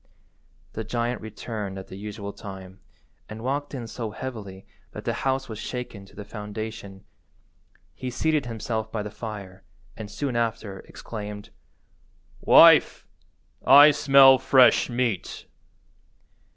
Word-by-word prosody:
The 110 - -4
giant 120 +2 -3
returned 105 -2 -6
at 95 - -9
the - - -9
usual 100 0 -7
time, 95 -1 -10 0.5
and 110 +1 -8
walked 140 +3 -3
in 120 -3 -6
so 115 0 -6
heavily 105 -5 -8 0.3
that - - -9
the - - 0 0.2
house 135 0 -1
was 110 -2 -8
shaken 115 -6 -7
to - - -20
the 105 - -9
foundation. 105 -2 -8 0.9
He 130 - -6
seated 150 +1 -1
himself 110 -1 -4
by 110 -2 -3
the 105 - -7
fire, 105 -4 -8 0.3
and, 110 -2 -8
soon 135 +1 -4
after, 110 -4 -2
exclaimed— 105 -2 -8 0.9
"Wife, - - +6 0.6
I 145 +3 +8
smell 135 -2 +6
fresh 130 0 +4
meat." 120 -5 -3
110 Hz, 125 wpm, -25 LUFS, 105-125 Hz, 0.9 s, I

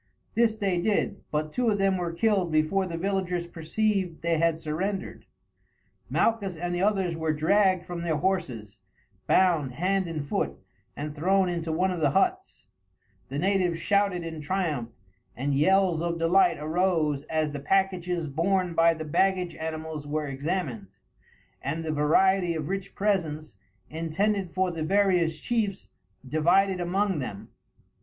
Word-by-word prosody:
This 230 -1 +3
they 195 -5 0
did, 205 +2 0
but 155 0 -2
two 245 +4 +1
of 205 - +1
them 195 -1 +2
were 175 -2 -2
killed 190 -1 +1
before 155 +5 +1
the 165 -2 -4
villagers 180 -1 -1
perceived 180 +1 -2
they 165 -1 +1
had 165 -1 +2
surrendered. 175 +5 -4 0.8
Malchus 205 -5 +1
and 175 +2 -3
the 175 - -1
others 190 -4 +1
were 160 -1 -1
dragged 185 +4 +2
from 175 -1 -5
their 170 -2 0
horses, 145 - -2 0.5
bound 165 -9 +3
hand 185 +6 0
and 155 -4 -4
foot, - - -1 0.4
and 150 +1 -5
thrown 185 +4 +2
into 170 -2 -2
one 180 +4 +1
of 180 - -3
the 150 -3 +3
huts. - - 0 0.6
The 135 - -4
natives 180 0 +1
shouted 200 -1 +1
in 160 -2 -6
triumph, 150 -7 -2 0.5
and 140 +4 -1
yells 180 +3 +3
of 170 0 -1
delight 170 +4 +3
arose 155 -2 0
as 155 -1 -1
the 145 - -5
packages 180 0 0
borne 175 +5 0
by 165 0 +4
the 155 0 -6
baggage 185 +3 +1
animals 160 -2 -5
were 150 +1 -2
examined, 140 - -3 0.7
and 155 +4 -3
the 155 - -1
variety 175 +4 +3
of 155 -2 -4
rich 195 0 -4
presents, 155 - -1 0.3
intended 180 +4 -1
for 185 0 0
the 165 -2 -5
various 180 -2 +2
chiefs, 210 -1 -2 0.4
divided 180 +6 +2
among 190 0 0
them. 100 -7 -6
170 Hz, 150 wpm, -27 LUFS, 155-190 Hz, 0.8 s, by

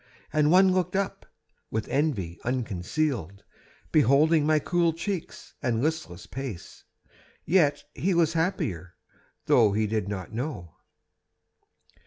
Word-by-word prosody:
And 150 -1 +3
one 185 +2 +6
looked 180 0 0
up, 195 0 -2 0.4
with 110 0 -3
envy 120 - -1
unconcealed, 115 - -2 0.5
Beholding 150 +2 +4
my 155 0 +4
cool 170 +2 +1
cheeks 170 +1 -5
and 115 -2 0
listless 155 - -3
pace, 130 -9 -8 0.6
Yet 155 -4 +3
he 185 +1 0
was 165 -1 +3
happier, 95 - -2 0.5
though 110 -4 +4
he 110 +1 +1
did 105 -2 -1
not 95 -2 -5
know. 115 - -5
145 Hz, 115 wpm, -27 LUFS, 105-165 Hz, 0.6 s, one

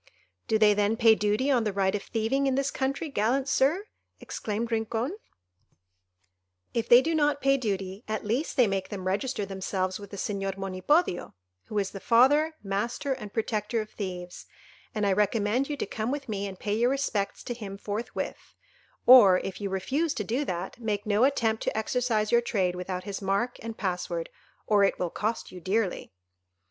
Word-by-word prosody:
"Do 220 - +3
they 215 -1 +5
then 205 +2 +1
pay 225 -1 +6
duty 215 +6 +1
on 245 -4 +3
the 210 - 0
right 195 -1 +1
of 205 - -1
thieving 240 +7 0
in 265 - +1
this 275 0 0
country, 275 +4 -2
gallant 265 +1 0
Sir?" 290 +9 +2 0.3
exclaimed 225 +2 -4
Rincon. 225 - -1 1.6
"If 230 -1 -1
they 245 +2 +8
do 330 - 0
not 295 -2 +2
pay 275 0 +3
duty, 200 -4 -3
at 215 0 -3
least 250 +9 -1
they 250 - +6
make 195 -2 -2
them 190 -3 -6
register 205 +3 -1
themselves 190 -1 -2
with 200 -1 -10
the 200 - -8
Señor 195 -1 -3
Monipodio, 195 - 0 0.3
who 210 - -5
is 195 -2 0
the 195 - -7
father, 290 +9 +4
master, 230 +8 -1
and 210 -6 -8
protector 220 0 -1
of 215 0 -5
thieves; 180 -3 -6 0.5
and 210 -1 0
I 200 - +3
recommend 210 +6 +1
you 295 - -2
to - - -2
come 220 +1 -3
with 280 +1 -3
me 200 -2 -3
and 190 -1 -8
pay 205 - -2
your 235 +3 +2
respects 260 -7 -1
to 245 - -4
him 205 -4 -7
forthwith, 210 +3 -5 0.5
or, 225 -8 +9
if 195 +1 -6
you 200 - -2
refuse 275 - -1
to 210 - -2
do 240 +8 -1
that, 180 +1 -4
make 210 -3 -2
no 215 +3 +3
attempt 225 -5 +1
to - - -1
exercise 220 -1 0
your 235 0 +5
trade 190 -6 0
without 180 0 -4
his 200 -1 -5
mark 200 +6 -1
and 225 0 -6
pass 180 -3 -2
word, 170 -1 -4 0.3
or 205 -2 +4
it 195 - +2
will 180 -2 -2
cost 220 +2 -3
you 180 - -10
dearly." 195 +1 -1
215 Hz, 190 wpm, -28 LUFS, 195-250 Hz, 1.6 s, or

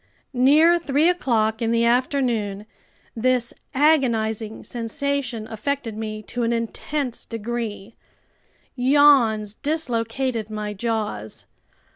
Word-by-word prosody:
Near 305 +7 +5
three 300 0 +2
o'clock 225 -10 +1
in 230 - +1
the 230 0 +2
afternoon, 235 -5 0 0.5
this 245 0 +1 0.2
agonizing 230 -7 +1
sensation 240 -1 -3
affected 230 +1 -3
me 215 -1 -5
to 245 - -5
an 230 0 +1
intense 240 +3 -3
degree. 230 -2 -5 0.8
Yawns 250 -6 +4
dislocated 245 -5 -2
my 210 -1 -4
jaws. 210 - -4
235 Hz, 95 wpm, -23 LUFS, 220-270 Hz, 0.8 s, Near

